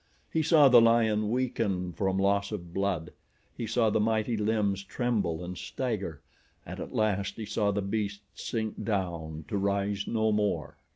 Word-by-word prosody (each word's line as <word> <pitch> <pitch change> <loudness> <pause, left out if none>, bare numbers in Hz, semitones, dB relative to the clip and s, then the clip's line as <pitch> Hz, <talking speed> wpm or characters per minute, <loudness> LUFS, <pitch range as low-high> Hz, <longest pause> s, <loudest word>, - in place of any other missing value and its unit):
He 160 - +2
saw 155 -2 +6
the 125 -3 +8
lion 110 -2 +3
weaken 105 -7 -1
from 95 +1 0
loss 100 +1 +1
of 85 -5 -6
blood. 95 -5 -1 0.4
He 115 - -4
saw 115 -1 +2
the - - +2
mighty 110 +1 +1
limbs 105 -2 0
tremble 100 -7 -1
and 90 +1 -6
stagger 100 - -4 0.4
and - - -7
at - - -6
last 100 -3 0
he 110 - -5
saw 105 -1 0
the 100 0 0
beast 100 0 -2
sink 110 -2 -4
down 85 -7 -3
to 100 - -2
rise 100 +1 0
no 110 -1 +1
more. 105 -1 -1
105 Hz, 165 wpm, -29 LUFS, 95-110 Hz, 0.4 s, the